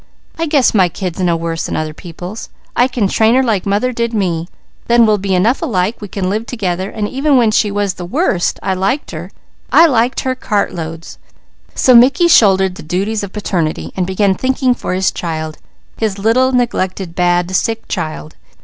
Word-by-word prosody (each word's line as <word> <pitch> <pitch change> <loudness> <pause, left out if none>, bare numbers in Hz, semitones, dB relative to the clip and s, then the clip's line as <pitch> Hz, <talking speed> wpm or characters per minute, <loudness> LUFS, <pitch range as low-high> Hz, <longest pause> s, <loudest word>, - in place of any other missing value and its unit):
I 330 - 0
guess 285 -4 +3
my 190 -5 +3
kid's 180 +1 -5
no 175 -2 +1
worse 165 0 -3
than - - -4
other 155 -1 -3
people's. 180 +6 -8 0.3
I 245 - +4
can 245 -6 0
train 220 +4 +3
her 265 - +4
like 215 -6 0
mother 205 +6 +1
did 235 0 -2
me; 175 -5 -1 0.4
then 235 -1 +5
we'll 210 -1 +2
be 190 -1 -1
enough 220 +8 +2
alike 195 0 -1
we 205 - -6
can 190 -1 -3
live 215 +4 -2
together, 190 -5 -3
and 210 -2 -3
even 275 +3 +1
when 230 -3 +3
she 210 0 +2
was 200 -1 -1
the 180 - -8
worst, 205 - 0
I 190 - 0
liked 195 +10 -1
her. - - -7 0.4
I 335 - +7
liked 250 -4 +1
her 260 - -1
cartloads." 165 -9 -3 0.6
So 255 - +4
Mickey 275 +8 +6
shouldered 190 - +4
the - - -10
duties 195 +7 -2
of 200 -2 -6
paternity, 180 -6 -2
and 185 -2 -1
began 190 +1 +2
thinking 260 +3 +1
for 185 - -4
his 190 0 +1
child, 160 -2 -5 0.4
his 215 -3 -1
little, 235 +6 +2
neglected, 195 -8 -1
bad, 175 +1 +1
sick 225 +3 -1
child. 80 - -5
200 Hz, 190 wpm, -15 LUFS, 180-235 Hz, 0.6 s, I